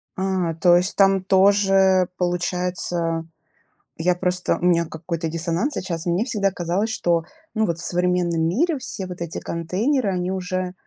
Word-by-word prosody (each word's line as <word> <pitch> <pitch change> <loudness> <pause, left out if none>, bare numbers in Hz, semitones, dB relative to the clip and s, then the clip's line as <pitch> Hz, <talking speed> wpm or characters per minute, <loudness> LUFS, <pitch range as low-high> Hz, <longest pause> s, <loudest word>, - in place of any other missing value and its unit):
А, 185 -3 -1
то 175 +1 +5
есть 180 +3 +1
там 195 -1 +4
тоже 195 -1 +4
получается, 175 -2 -1 0.7
я 175 +2 +2
просто 180 0 0
у 180 - 0
меня 170 -1 +3
какой-то 165 0 -4
диссонанс 170 - -1
сейчас. 170 -3 -4
Мне 175 +6 +1
всегда 200 -6 0
казалось, 180 +5 -1
что, 170 -6 +1 0.3
ну, 220 -1 +1
вот 170 -2 -2
в - - -6
современном 180 -2 0
мире 275 - +1
все 205 -6 -6
вот 180 -1 -8
эти 170 -1 -4
контейнеры, 200 - -1
они 180 0 -1
уже 185 -1 -3
180 Hz, 155 wpm, -22 LUFS, 170-195 Hz, 0.7 s, то